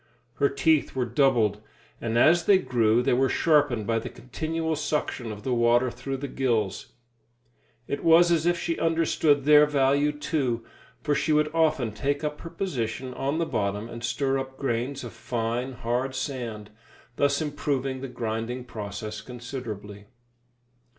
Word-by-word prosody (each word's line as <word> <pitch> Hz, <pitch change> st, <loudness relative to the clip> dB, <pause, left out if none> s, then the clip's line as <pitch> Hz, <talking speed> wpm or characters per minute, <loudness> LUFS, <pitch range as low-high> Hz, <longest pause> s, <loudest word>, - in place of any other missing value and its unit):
Her 140 Hz, -, +3 dB
teeth 150 Hz, +1 st, +2 dB
were 130 Hz, -2 st, 0 dB
doubled, 120 Hz, -5 st, +2 dB, 0.4 s
and 115 Hz, 0 st, -1 dB
as 165 Hz, +7 st, +5 dB
they 200 Hz, -, +6 dB
grew 120 Hz, -7 st, +2 dB
they -, -, +2 dB
were 130 Hz, +2 st, +3 dB
sharpened 145 Hz, -9 st, +2 dB
by 115 Hz, +1 st, +1 dB
the -, -, -6 dB
continual 160 Hz, +5 st, -3 dB
suction 150 Hz, -6 st, -2 dB
of 105 Hz, -1 st, -8 dB
the 130 Hz, -, -1 dB
water 120 Hz, +1 st, +3 dB
through 135 Hz, +3 st, -5 dB
the 140 Hz, +2 st, -5 dB
gills. 115 Hz, -8 st, -1 dB, 1.0 s
It 140 Hz, -, -3 dB
was 170 Hz, +1 st, +6 dB
as 165 Hz, 0 st, +2 dB
if 175 Hz, 0 st, +3 dB
she 165 Hz, -, -2 dB
understood 160 Hz, -3 st, +2 dB
their 150 Hz, 0 st, +7 dB
value, 140 Hz, 0 st, +2 dB
too, 140 Hz, -6 st, -2 dB, 0.4 s
for 150 Hz, -, +1 dB
she 155 Hz, -, 0 dB
would 150 Hz, 0 st, +2 dB
often 155 Hz, -8 st, +2 dB
take 140 Hz, +7 st, -2 dB
up 150 Hz, 0 st, -3 dB
her 165 Hz, -, -7 dB
position 130 Hz, -, -3 dB
on 140 Hz, +4 st, -2 dB
the 170 Hz, -, +1 dB
bottom 105 Hz, -4 st, -2 dB
and 115 Hz, 0 st, -8 dB
stir 135 Hz, +2 st, 0 dB
up 130 Hz, 0 st, -7 dB
grains 130 Hz, +1 st, -2 dB
of 120 Hz, -, -8 dB
fine, 120 Hz, +2 st, -3 dB
hard 125 Hz, +2 st, -2 dB
sand, 120 Hz, -6 st, -5 dB, 0.5 s
thus 140 Hz, 0 st, +2 dB
improving 140 Hz, -3 st, -2 dB
the 135 Hz, -, -4 dB
grinding 120 Hz, +1 st, -4 dB
process 105 Hz, -1 st, -6 dB
considerably. 110 Hz, -4 st, -7 dB
130 Hz, 155 wpm, -26 LUFS, 115-150 Hz, 1.0 s, their